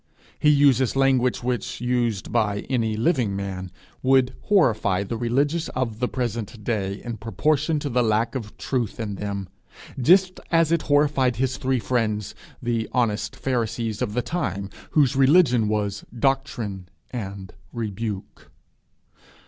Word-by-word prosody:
He 150 - +4
uses 140 -4 +4
language 130 -3 +2
which, 125 -1 -2
used 120 -5 -1
by 105 -3 +1
any 110 -4 0
living 120 - +1
man, 95 -2 -4 0.3
would 130 -1 +3
horrify 110 - +3
the 110 +4 -4
religious 140 +8 0
of 115 -4 -2
the 125 - +1
present 120 -3 -4
day, 100 -3 -2
in 120 -2 -5
proportion 150 - 0
to 145 - -2
the 125 -2 +1
lack 110 0 +1
of 115 -6 -6
truth 125 -4 -2
in 105 -3 -3
them, 100 -1 -4 0.5
just 185 +7 +4
as 165 -1 +3
it 170 -1 +3
horrified 145 -4 +2
his 130 +2 -1
three 130 0 0
friends, 110 -4 -1 0.3
the 115 -2 -1
honest 110 -3 0
pharisees 115 -3 -2
of 105 - -2
the 125 - +1
time, 100 - -3 0.2
whose 140 -3 +3
religion 135 -5 +5
was 105 -1 -1
'doctrine' 115 -8 -1 0.2
and 100 -5 -6 0.2
rebuke. 110 -3 -5
120 Hz, 140 wpm, -24 LUFS, 105-135 Hz, 0.5 s, religion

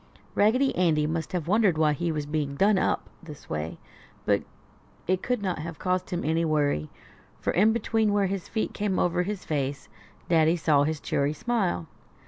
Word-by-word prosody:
Raggedy 255 +6 +3
Andy 160 -4 +2
must 160 +1 -2
have 175 -4 -2
wondered 200 -3 +3
why 155 -1 +3
he 170 +3 -1
was 150 -2 -2
being 145 -2 -2
"done 200 +5 +4
up" - - 0
this 150 -4 -11
way, 75 +2 -3 0.5
but - - +3 0.6
it 185 +1 +1
could 250 -4 -1
not 185 -4 -1
have 160 +1 -6
caused 185 0 -1
him 175 -3 -3
any 160 +2 +1
worry, 145 - +1 0.5
for - - -1
in 210 +5 +4
between 220 -1 +1
where 205 -1 +2
his 190 -1 -3
feet 220 - -2
came 205 -3 -1
over 175 0 +2
his 195 +1 -4
face 140 -2 -2 0.4
Daddy 165 0 +4
saw 150 -3 +3
his 155 0 -2
cheery 140 +1 0
smile. 155 - -1
170 Hz, 180 wpm, -27 LUFS, 150-200 Hz, 0.6 s, done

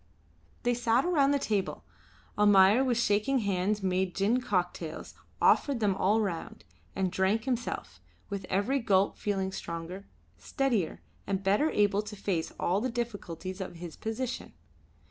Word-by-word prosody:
They 245 0 +2
sat 240 +2 +2
around 300 -6 +3
the 285 - +3
table. 210 -7 -2 0.5
Almayer 205 +3 +6
with 250 -3 +1
shaking 215 +4 +2
hands 200 +1 0
made 185 -1 0
gin 215 +6 +2
cocktails, 180 -7 -2 0.3
offered 280 -4 +3
them 205 -3 +2
all 205 +4 +2
round, 185 -6 -4 0.3
and 190 -2 0
drank 190 +4 +1
himself, 235 - -3 0.3
with 200 -1 -5
every 205 +9 +1
gulp 200 -4 +2
feeling 195 -2 -2
stronger, 175 +2 -6 0.3
steadier, 240 -11 -1 0.2
and 195 -1 -1
better 205 +11 +3
able 205 -3 +2
to 210 0 -8
face 190 -5 -2
all 185 +4 +1
the 255 - -1
difficulties 200 -6 -5
of 185 - -6
his 170 -1 -8
position. 230 +3 -4
205 Hz, 145 wpm, -29 LUFS, 190-235 Hz, 0.5 s, Almayer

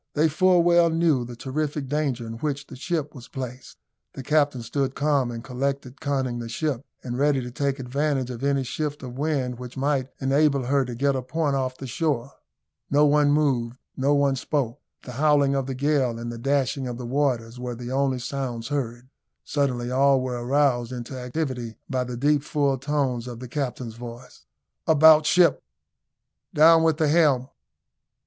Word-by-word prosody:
They 155 +2 +3
full 180 +2 +4
well 170 0 +5
knew 160 -5 +2
the 120 0 -8
terrific 145 +3 -3
danger 135 -4 -1
in 115 0 -7
which 145 -1 -2
the - - -11
ship 150 +2 -3
was 125 -5 -11
placed. 130 -2 -7 0.4
The 135 - -7
captain 145 -3 +1
stood 135 +3 -2
calm 140 -4 +1
and 115 -1 -6
collected, 135 +1 -3
conning 130 -4 -1
the 115 -1 -6
ship, 140 0 -2 0.2
and 125 0 -4
ready 145 -1 +3
to 125 -1 -6
take 140 +1 -1
advantage 135 0 -1
of 120 +1 -7
any 140 -1 +1
shift 145 +2 -4
of 125 -1 -7
wind 135 -5 -1
which 125 +1 -9
might 135 -1 0
enable 140 0 +2
her 135 +1 +2
to 120 -1 -6
get 140 +3 +1
a 130 - -1
point 145 +2 -1
off 130 -1 -2
the 135 - -7
shore. 140 -1 -1 0.6
No 145 +2 +4
one 145 0 +4
moved 130 -5 +1 0.2
no 140 +2 +2
one 140 -1 +2
spoke 135 -1 -2 0.2
the 125 - -8
howling 145 +1 +3
of 135 -1 -1
the 135 - -3
gale 135 -3 +1
and 120 0 -5
the 115 - -7
dashing 135 0 0
of 120 -1 -5
the 125 - -6
waters 125 -3 -1
were 125 -1 -4
the 120 +1 -7
only 135 -1 +1
sounds 125 -2 -4
heard. 125 -4 -3 0.4
Suddenly 125 -4 -1
all 135 +1 +4
were 125 -2 -3
aroused 130 -2 +1
into 125 +1 -6
activity 125 -3 -4
by 130 -2 -1
the 125 -1 -5
deep 145 +3 +2
full 140 -2 0
tones 130 -4 -1
of 120 -2 -7
the 125 - -7
captain's 125 -3 -4
voice. 120 +1 -11 0.4
"About 155 0 +7
ship!" 180 -1 +4 0.9
"Down 165 +2 +7
with 160 -2 +2
the 160 -2 +2
helm!" 145 -5 +3
135 Hz, 185 wpm, -25 LUFS, 125-145 Hz, 0.9 s, About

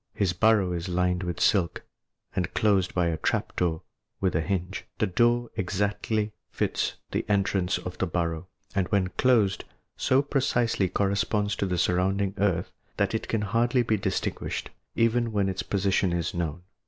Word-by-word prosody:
His 95 -3 +1
burrow 105 -1 +3
is 90 +1 -3
lined 90 0 +1
with 90 -2 -3
silk, 90 -6 +2 0.5
and 95 -2 -1
closed 100 -4 +2
by 90 -1 +2
a 80 - -1
trap - - -1
door 85 -3 0 0.4
with 95 -4 0
a 80 - +2
hinge. 95 +1 -2
The - - +2
door 120 +5 +2
exactly 105 +3 -1 0.2
fits - - -1 0.2
the - - 0
entrance 100 -2 +1
to - - -4
the 95 - -2
burrow, 85 0 -2 0.3
and 95 -3 +1
when 95 -3 +1
closed, 110 -5 +2 0.3
so 130 +2 +3
precisely 120 -8 +1
corresponds 100 +2 0
with 100 - +1
the 90 - 0
surrounding 95 +3 +1
earth 95 -4 +1 0.3
that 100 +1 +1
it 110 - -2
can 110 - 0
hardly 120 +4 +2
be 110 -2 +1
distinguished, 95 - -2 0.2
even 115 0 +2
when 100 -2 +1
its 95 0 -2
position 95 -2 +1
is 85 -1 -1
known. 85 0 -3
95 Hz, 165 wpm, -27 LUFS, 90-110 Hz, 0.5 s, burrow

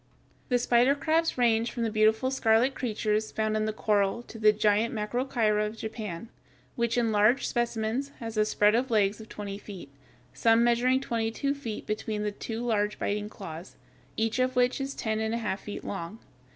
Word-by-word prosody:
The 250 - +3
spider 245 +3 +3
crabs 320 +2 +1
range 230 -1 +2
from 235 - -3
the 225 - -1
beautiful 220 +4 +2
scarlet 240 0 +3
creatures 215 -3 -1
found 215 0 -1
in 215 0 0
the 215 - 0
coral 210 +1 0
to 225 - -11
the 215 -1 +6
giant 210 +2 +1
Macrocheira 215 -1 0
of 210 +1 -4
Japan, 220 -3 -6 0.5
which 235 0 0
in 230 -2 +2
large 215 +5 +3
specimens 240 +2 -1
has 225 -1 -6
a 215 - +3
spread 210 0 +3
of 250 +3 +1
legs 210 -1 +2
of 220 - -12
twenty 200 -1 -6
feet, 190 -9 -10 0.4
some 225 - +4
measuring 245 +2 +3
twenty 230 -4 -1
two 280 +5 -1
feet 240 -7 -6
between 215 0 -3
the 210 - -1
two 225 +3 -5
large 210 -3 0
biting 210 +1 -2
claws, 175 -5 -9 0.4
each 225 +2 0
of 255 0 +1
which 250 +2 +2
is 270 0 -4
ten 220 -1 -2
and 220 +1 -1
a - - 0
half 210 -4 -2
feet 205 - -7
long. 195 +2 -5
220 Hz, 190 wpm, -28 LUFS, 210-240 Hz, 0.5 s, the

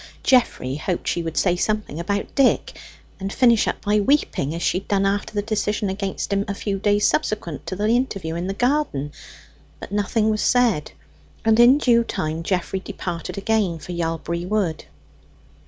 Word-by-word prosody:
Geoffrey 145 - +2
hoped 175 +3 -3
she 170 - 0
would 165 -1 -5
say 180 -2 +3
something 210 -4 -2
about 200 +4 -2
Dick, 275 -2 +2 0.4
and 195 0 -4
finish 235 -2 +4
up - - -2
by 210 +1 +3
weeping, 200 - +1
as 170 - -4
she 185 - +1
had 195 - -17
done 195 -1 +1
after 200 +1 0
the 205 - 0
decision 210 -1 -1
against 195 0 -3
him 200 0 +1
a 200 - -3
few 200 -1 -3
days 205 0 +2
subsequent 175 -8 -1
to 185 - -3
the 205 +3 -1
interview 215 -8 0
in 170 +2 -3
the 195 - -3
garden. 245 - 0 0.7
But - - -9
nothing 210 +2 +1
was 215 - -1
said, 235 -11 +2 0.5
and 225 0 +4
in 245 +4 +7
due 240 -5 +3
time 155 -6 -3
Geoffrey 185 +2 -1
departed 175 -1 -6
again 200 -4 0
for 170 - -9
Yalbury 170 0 -2
Wood. 185 - -1
200 Hz, 175 wpm, -22 LUFS, 170-215 Hz, 0.7 s, in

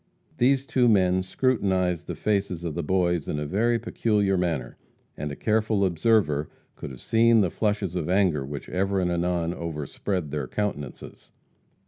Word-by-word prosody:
These 135 +2 +3
two 125 -3 +3
men 95 -3 +3
scrutinized 95 -5 0
the - - -4
faces 100 -5 -1
of 85 -3 -3
the 85 - -2
Boys 85 -1 0
in - - -2
a 75 - -2
very 115 +9 +1
peculiar 105 -3 0
manner, 85 -8 -2 0.4
and 75 - -4
a - - -5
careful 110 0 +1
observer 85 -4 +2 0.3
could - - -7
have 65 -2 -11
seen 115 0 +4
the 90 -4 +1
flushes 105 -4 -1
of 90 -2 -3
anger 90 -7 +2
which 70 +1 -7
ever 95 +1 0
and 90 -1 0
anon 85 -1 0
overspread 80 +1 -4
their 70 -3 -3
countenances. 75 -10 -5
95 Hz, 160 wpm, -25 LUFS, 80-105 Hz, 0.4 s, seen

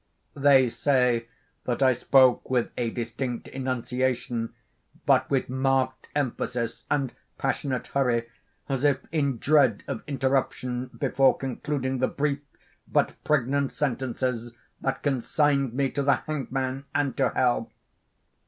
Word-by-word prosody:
They 140 -2 +5
say 125 -4 +2 0.4
that 125 +2 0
I 130 -1 +6
spoke 130 +1 +4
with 125 -2 +1
a 120 -2 -1
distinct 120 +1 -4
enunciation, 125 -2 -2 0.5
but - - +3
with 135 -2 +1
marked 130 -1 0
emphasis 125 -4 -2
and 140 -4 0 0.2
passionate 135 -1 -1
hurry, 120 -4 0 0.4
as 135 -1 -2
if 145 -2 +4
in 140 -5 0
dread 135 -4 +3
of - - -3
interruption 130 -2 -1
before 135 +1 +2
concluding 135 0 -2
the 130 - +2
brief 145 -1 -1 0.5
but - - +2
pregnant 140 -1 +1
sentences 125 -3 -2 0.3
that 135 - -2
consigned 140 -1 +1
me 135 -1 +1
to 140 - -1
the 140 0 +4
hangman 135 -2 -3
and 145 -2 +1
to - - +3
hell. - - +1
130 Hz, 125 wpm, -26 LUFS, 125-140 Hz, 0.5 s, I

